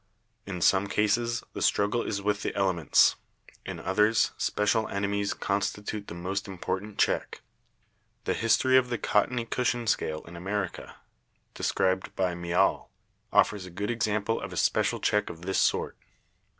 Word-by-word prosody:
In 90 Hz, -3 st, -5 dB
some 95 Hz, +3 st, +4 dB
cases 115 Hz, +4 st, +1 dB
the -, -, -5 dB
struggle 105 Hz, +4 st, +2 dB
is 100 Hz, -3 st, -3 dB
with 105 Hz, 0 st, 0 dB
the -, -, -3 dB
elements, 95 Hz, -6 st, +3 dB, 0.5 s
in -, -, -5 dB
others 105 Hz, +4 st, +2 dB
special 105 Hz, +2 st, +1 dB
enemies 100 Hz, 0 st, -1 dB
constitute 105 Hz, +1 st, -2 dB
the -, -, -7 dB
most 95 Hz, +4 st, -3 dB
important 95 Hz, +2 st, -4 dB
check. -, -, 0 dB, 0.8 s
The -, -, 0 dB
history 115 Hz, +3 st, +3 dB
of 125 Hz, -1 st, +2 dB
the 120 Hz, -, -1 dB
cottony 115 Hz, +3 st, +1 dB
cushion 120 Hz, 0 st, -1 dB
scale 80 Hz, -7 st, -1 dB
in 85 Hz, -, -11 dB
America, 95 Hz, +2 st, -4 dB, 0.6 s
described 95 Hz, 0 st, 0 dB
by 90 Hz, -2 st, 0 dB
Miall, 85 Hz, 0 st, +1 dB, 0.4 s
offers 100 Hz, -3 st, +2 dB
a -, -, -9 dB
good 100 Hz, +5 st, -3 dB
example 110 Hz, -1 st, 0 dB
of 95 Hz, -, -6 dB
a 90 Hz, -, -7 dB
special -, -, +1 dB
check 105 Hz, 0 st, +1 dB
of 80 Hz, +1 st, -9 dB
this 95 Hz, +1 st, 0 dB
sort. -, -, +1 dB
100 Hz, 150 wpm, -28 LUFS, 95-110 Hz, 0.8 s, some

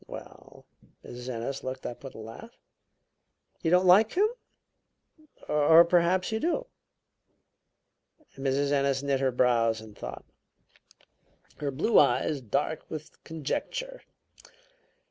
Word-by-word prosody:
"Well -, -, -12 dB, 0.2 s
" -, -, -26 dB
Mrs. 125 Hz, +1 st, -8 dB
Ennis 125 Hz, +3 st, -4 dB
looked 130 Hz, 0 st, -6 dB
up 120 Hz, -, -7 dB
with 135 Hz, -, -9 dB
a -, -, -10 dB
laugh. 115 Hz, -, -11 dB, 1.0 s
"You 165 Hz, -, 0 dB
don't 180 Hz, +2 st, +4 dB
like 200 Hz, +5 st, +6 dB
him? 405 Hz, +4 st, +3 dB, 1.2 s
Or 160 Hz, +3 st, +6 dB
perhaps 180 Hz, +2 st, +2 dB
you 220 Hz, -, -1 dB
do?" 350 Hz, -, -1 dB, 1.7 s
Mrs. 140 Hz, +1 st, 0 dB
Ennis 140 Hz, -1 st, +1 dB
knit 140 Hz, -1 st, 0 dB
her 135 Hz, -1 st, +1 dB
brows 115 Hz, -3 st, +2 dB
in 110 Hz, -1 st, -12 dB
thought, -, -, -8 dB, 1.3 s
her 145 Hz, -, -3 dB
blue 150 Hz, -, +3 dB
eyes 140 Hz, +2 st, +2 dB
dark 125 Hz, +7 st, -2 dB
with 155 Hz, -1 st, -9 dB
conjecture. -, -, -4 dB
140 Hz, 120 wpm, -28 LUFS, 130-180 Hz, 1.7 s, like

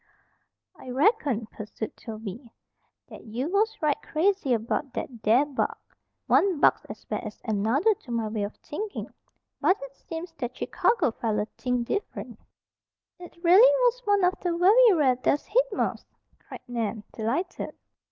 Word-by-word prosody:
"I 255 Hz, -, -10 dB
reckoned," 265 Hz, -, +1 dB
pursued 215 Hz, +1 st, -7 dB
Toby, 225 Hz, +1 st, -8 dB, 0.6 s
"that -, -, -11 dB
you 240 Hz, +7 st, -3 dB
was 435 Hz, +2 st, +1 dB
right 295 Hz, -2 st, +1 dB
crazy 340 Hz, -3 st, 0 dB
about 235 Hz, +4 st, -1 dB
that 235 Hz, -4 st, -6 dB
there 230 Hz, +6 st, +4 dB
bug. 285 Hz, -3 st, -2 dB, 0.5 s
One 380 Hz, -6 st, +3 dB
bug's -, -, +4 dB
as -, -, -10 dB
bad -, -, -3 dB
as -, -, -8 dB
another 225 Hz, -, +2 dB
to 275 Hz, -10 st, -13 dB
my 230 Hz, -2 st, -1 dB
way 215 Hz, 0 st, -3 dB
of 205 Hz, +1 st, -4 dB
thinkin'. 410 Hz, +7 st, -6 dB, 0.5 s
But 375 Hz, -, +3 dB
it 275 Hz, 0 st, -9 dB
seems 330 Hz, +3 st, -7 dB
that 250 Hz, -1 st, -4 dB
Chicago 465 Hz, -, +1 dB
feller 215 Hz, -2 st, -1 dB
thinked 250 Hz, -2 st, -2 dB
dif'rent." 410 Hz, -, -4 dB, 0.8 s
"It 350 Hz, -1 st, -12 dB
really 355 Hz, +3 st, +7 dB, 0.2 s
was -, -, +2 dB
one 405 Hz, -2 st, +3 dB
of 360 Hz, +1 st, +4 dB
the 345 Hz, -2 st, -1 dB
very 435 Hz, +7 st, +6 dB
rare 280 Hz, -8 st, +3 dB
death's 275 Hz, +3 st, 0 dB
head -, -, +2 dB
moths?" 405 Hz, -, -3 dB, 0.2 s
cried -, -, -11 dB
Nan, 230 Hz, -3 st, -3 dB
delighted. 270 Hz, +12 st, -3 dB
275 Hz, 150 wpm, -26 LUFS, 230-370 Hz, 0.8 s, really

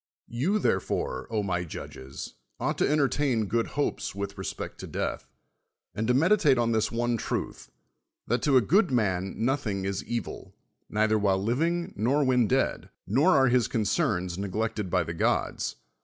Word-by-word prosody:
You, 145 Hz, -, +1 dB
therefore, -, -, -1 dB, 0.2 s
my 90 Hz, -2 st, -1 dB
judges, 70 Hz, -5 st, -8 dB, 0.3 s
ought -, -, -1 dB
to -, -, +3 dB
enter 150 Hz, -2 st, +3 dB
tain 130 Hz, -6 st, 0 dB
good 115 Hz, +3 st, 0 dB
hopes 145 Hz, -, -1 dB
with 100 Hz, 0 st, -4 dB
respect 95 Hz, -, -6 dB
to -, -, -7 dB
death, -, -, -3 dB, 0.6 s
and 110 Hz, +1 st, -2 dB
to 125 Hz, -, +3 dB
meditate 160 Hz, -2 st, +4 dB
on 115 Hz, -1 st, +2 dB
this 110 Hz, -1 st, +1 dB
one 120 Hz, 0 st, 0 dB
truth, -, -, -4 dB, 0.6 s
that 120 Hz, +2 st, 0 dB
1o 140 Hz, -3 st, +4 dB
a -, -, +6 dB
good 185 Hz, -, +3 dB
man 95 Hz, -7 st, 0 dB
nothing 115 Hz, -8 st, -1 dB
is 100 Hz, 0 st, -2 dB
evil, 120 Hz, 0 st, -5 dB, 0.3 s
neither 110 Hz, 0 st, +2 dB
while 100 Hz, -2 st, +2 dB
]ivi; 125 Hz, +8 st, +2 dB, 0.2 s
ig -, -, -20 dB
nor 135 Hz, +7 st, +2 dB
when 125 Hz, -4 st, +3 dB
dead, 135 Hz, +3 st, 0 dB, 0.2 s
nor 145 Hz, -, +4 dB
are 135 Hz, -1 st, +5 dB
his 125 Hz, -2 st, +3 dB
concerns 95 Hz, -4 st, 0 dB
neglected 105 Hz, +1 st, -2 dB
by -, -, +2 dB
the 85 Hz, +1 st, -5 dB
gods. 80 Hz, -, 0 dB
115 Hz, 165 wpm, -27 LUFS, 100-135 Hz, 0.6 s, a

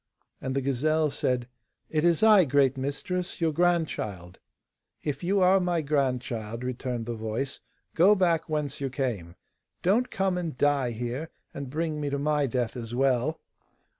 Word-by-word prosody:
And 130 Hz, 0 st, -3 dB
the 135 Hz, -, +1 dB
gazelle 150 Hz, +4 st, +1 dB
said, 125 Hz, -3 st, -1 dB, 0.4 s
'It 155 Hz, -1 st, +1 dB
is 170 Hz, +2 st, +3 dB
I, 215 Hz, -4 st, +7 dB
great 135 Hz, -2 st, +3 dB
mistress, 160 Hz, +7 st, -3 dB
your 165 Hz, -2 st, +2 dB
grandchild.' 145 Hz, -, -1 dB, 0.6 s
'If 150 Hz, +3 st, -3 dB
you 195 Hz, +2 st, +2 dB
are 185 Hz, +1 st, +5 dB
my 175 Hz, -3 st, 0 dB
grandchild,' 125 Hz, -5 st, -1 dB
returned 125 Hz, -2 st, -3 dB
the 120 Hz, -, -3 dB
voice, 110 Hz, +5 st, -3 dB, 0.3 s
'go 190 Hz, +6 st, +6 dB
back 170 Hz, -4 st, +1 dB
whence 150 Hz, -2 st, -2 dB
you 135 Hz, -, -1 dB
came. 115 Hz, -11 st, -3 dB, 0.5 s
Don't 220 Hz, +8 st, +3 dB
come 190 Hz, -2 st, 0 dB
and 165 Hz, -7 st, -4 dB
die 140 Hz, -3 st, +2 dB
here, 120 Hz, +7 st, -4 dB, 0.2 s
and 140 Hz, -2 st, -6 dB
bring 155 Hz, +1 st, -2 dB
me 145 Hz, -, -1 dB
to 140 Hz, -, -1 dB
my 145 Hz, 0 st, +1 dB
death 125 Hz, -1 st, -1 dB
as 120 Hz, -1 st, -5 dB
well. 135 Hz, +4 st, +1 dB
140 Hz, 160 wpm, -27 LUFS, 125-165 Hz, 0.6 s, I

